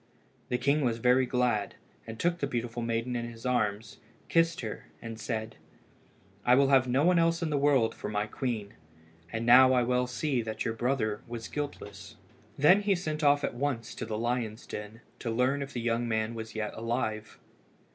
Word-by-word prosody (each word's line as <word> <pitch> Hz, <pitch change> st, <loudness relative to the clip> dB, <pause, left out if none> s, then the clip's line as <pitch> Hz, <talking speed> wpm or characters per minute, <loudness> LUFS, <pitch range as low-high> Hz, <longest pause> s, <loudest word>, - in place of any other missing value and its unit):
The 125 Hz, -, +1 dB
king 140 Hz, +4 st, +2 dB
was 120 Hz, -4 st, +1 dB
very 125 Hz, +2 st, +3 dB
glad, 120 Hz, -6 st, 0 dB, 0.3 s
and 115 Hz, 0 st, -8 dB
took 175 Hz, 0 st, +1 dB
the 140 Hz, -, -1 dB
beautiful 120 Hz, -2 st, -3 dB
maiden 115 Hz, +1 st, -1 dB
in 120 Hz, 0 st, -3 dB
his 115 Hz, +1 st, -12 dB
arms, 105 Hz, -4 st, -1 dB, 0.3 s
kissed 165 Hz, -1 st, +2 dB
her, 110 Hz, -3 st, -6 dB
and 115 Hz, -1 st, -8 dB
said 110 Hz, 0 st, -4 dB, 0.9 s
"I 125 Hz, -, +5 dB
will 135 Hz, 0 st, +4 dB
have 130 Hz, -2 st, +5 dB
no 130 Hz, +3 st, +2 dB
one 180 Hz, -1 st, +4 dB
else 165 Hz, 0 st, +2 dB
in 160 Hz, -, -1 dB
the 145 Hz, -, +1 dB
world 135 Hz, -5 st, +3 dB
for -, -, -6 dB
my 105 Hz, 0 st, -1 dB
queen, 110 Hz, -2 st, -4 dB, 0.6 s
and 115 Hz, +1 st, -3 dB
now 130 Hz, +2 st, +8 dB
I 125 Hz, -1 st, +3 dB
well 125 Hz, +1 st, +1 dB
see 125 Hz, +1 st, -1 dB
that 110 Hz, -1 st, -4 dB
your 115 Hz, -, 0 dB
brother 115 Hz, -3 st, -1 dB
was 115 Hz, -1 st, -6 dB
guiltless." 145 Hz, -1 st, -6 dB, 0.4 s
Then 180 Hz, +8 st, +6 dB
he 200 Hz, -1 st, +2 dB
sent 155 Hz, -3 st, -3 dB
off 145 Hz, 0 st, +4 dB
at -, -, -1 dB
once 125 Hz, -3 st, -2 dB
to -, -, -6 dB
the 110 Hz, -1 st, -3 dB
lions' 115 Hz, -1 st, -2 dB
den 105 Hz, +2 st, -8 dB, 0.2 s
to 120 Hz, -, -4 dB
learn 125 Hz, +5 st, +1 dB
if 140 Hz, 0 st, -5 dB
the 120 Hz, -, -3 dB
young 120 Hz, 0 st, 0 dB
man 110 Hz, 0 st, -1 dB
was 110 Hz, -1 st, -7 dB
yet 105 Hz, -1 st, -3 dB
alive. 110 Hz, -2 st, -3 dB
120 Hz, 195 wpm, -29 LUFS, 115-135 Hz, 0.9 s, now